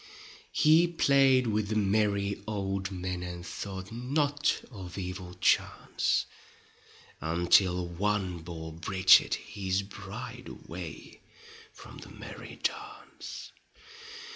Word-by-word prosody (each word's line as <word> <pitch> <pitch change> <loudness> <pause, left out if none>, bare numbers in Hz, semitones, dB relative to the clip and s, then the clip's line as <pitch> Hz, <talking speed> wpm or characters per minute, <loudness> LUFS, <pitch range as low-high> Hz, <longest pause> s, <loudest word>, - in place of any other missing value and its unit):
He 160 +3 +5
played 135 -6 +4
with 105 -2 0
the 110 - -2
merry 100 -1 +1
old 100 -2 -2
men 90 -1 -4
And 90 -1 -6
thought 95 0 -6
not 145 +5 0
of 95 -5 -8
evil 90 -1 -5
chance, 90 - +1 1.0
Until 85 +2 +3
one 95 0 -1
bore 80 -1 -7
Bridget 95 +3 +5
his 95 -1 -2
bride 115 +6 -8
Away - - -9 0.5
from - - -12
the - - -11
merry - - -10
dance. 420 -1 -5
100 Hz, 100 wpm, -30 LUFS, 90-115 Hz, 1.0 s, He